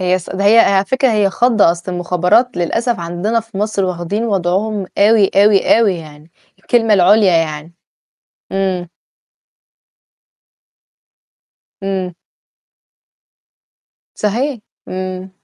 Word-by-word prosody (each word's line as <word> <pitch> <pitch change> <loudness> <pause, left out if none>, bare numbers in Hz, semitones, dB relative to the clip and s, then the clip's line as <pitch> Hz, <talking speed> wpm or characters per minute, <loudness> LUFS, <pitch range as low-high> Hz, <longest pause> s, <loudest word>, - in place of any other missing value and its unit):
هي 185 0 +1
ص 175 - -12
ده 200 +1 -3
هي 220 +3 +5
على 195 -3 +4
فكرة 260 +5 0
هي 205 -2 +1
خضّة، 230 -5 +3
أصل 170 +2 -5
المخابرات 180 +6 +1
للأسف 225 +5 -1
عندنا 175 +7 -2
في 225 -3 -10
مصر 210 -1 -1
واخدين 185 +4 -3
وضعهم 200 0 -1
أوي، 205 -1 +4
أوي، 205 +1 +4
أوي 215 -5 +2
يعني، 155 -1 -12 0.3
الكلمة 225 -3 +1
العُليا 195 +1 +4
يعني. 160 0 -3 0.8
إمم. 190 -2 -2 3.0
امم. 190 -2 -3 2.0
صحيح، 240 +5 -2 0.3
إمم. 185 0 -6
195 Hz, 105 wpm, -16 LUFS, 180-215 Hz, 3.0 s, هي